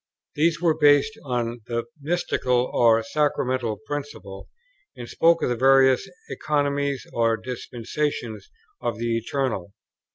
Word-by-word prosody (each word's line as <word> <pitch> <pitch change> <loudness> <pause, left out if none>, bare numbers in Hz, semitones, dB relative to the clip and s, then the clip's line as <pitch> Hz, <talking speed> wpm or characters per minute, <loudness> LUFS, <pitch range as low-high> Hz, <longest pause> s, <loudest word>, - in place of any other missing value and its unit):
These 165 +3 +1
were 170 -2 +3
based 145 +7 +4
on 120 -3 -3
the 115 -1 -2 0.2
mystical 130 -6 0
or 115 -1 +4
sacramental 130 -6 -1
principle, 140 -10 -7 0.5
and 120 - -8
spoke 165 +5 +3
of - - +1
the 120 - 0
various 135 +6 +4 0.2
Economies 140 -2 -1
or 115 -1 +2
Dispensations 120 0 -4 0.3
of 115 - -2
the 115 0 -1
Eternal. 115 -5 -2
130 Hz, 120 wpm, -24 LUFS, 115-145 Hz, 0.5 s, based